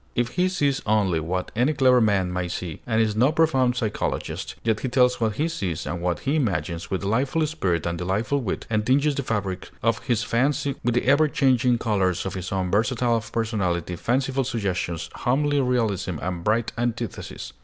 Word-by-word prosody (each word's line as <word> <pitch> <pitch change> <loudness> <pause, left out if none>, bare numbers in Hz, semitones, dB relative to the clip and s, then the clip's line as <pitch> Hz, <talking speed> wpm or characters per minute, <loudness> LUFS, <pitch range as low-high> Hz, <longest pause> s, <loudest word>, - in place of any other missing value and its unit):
If 120 0 +1
he 180 +1 +1
sees 145 -7 0
only 100 -6 +2
what 90 +4 -3
any 125 +7 +2
clever 130 -3 +4
man 95 -4 +2
may 90 -1 -1
see, 85 -2 -5
and 110 -2 +1
is 110 -2 +2
no 125 +6 +4
profound 150 -7 +2
psychologist, 110 -4 -3
yet 110 -2 +1
he 130 - -2
tells 125 -1 +3
what 110 -2 +1
he 155 +6 0
sees 95 - -3
and 90 - -4
what 90 0 -1
he 145 +3 0
imagines 90 - -2
with 95 - -2
delightful 130 +10 +1
spirit 95 - -1
and 85 -1 -2
delightful 105 +10 0
wit, 110 - -3
and 110 -1 0
tinges 140 +5 +3
the 140 - -2
fabric 100 -7 -3
of 115 0 +2
his 115 -2 +1
fancy 135 +5 +1
with 120 0 +1
the 120 - +1
ever 140 +4 +5
changing 125 -4 +2
colors 95 -6 0
of 95 - -3
his 90 -1 -5
own 95 -2 -1
versatile 115 +2 +1
personality, 100 -7 -2
fanciful 135 +7 0
suggestions, 95 -8 -2
homely 145 +3 +1
realism, 105 - 0
and 90 -2 -4
bright 110 +3 +1
antithesis. 120 -2 -4
115 Hz, 185 wpm, -24 LUFS, 95-130 Hz, -, ever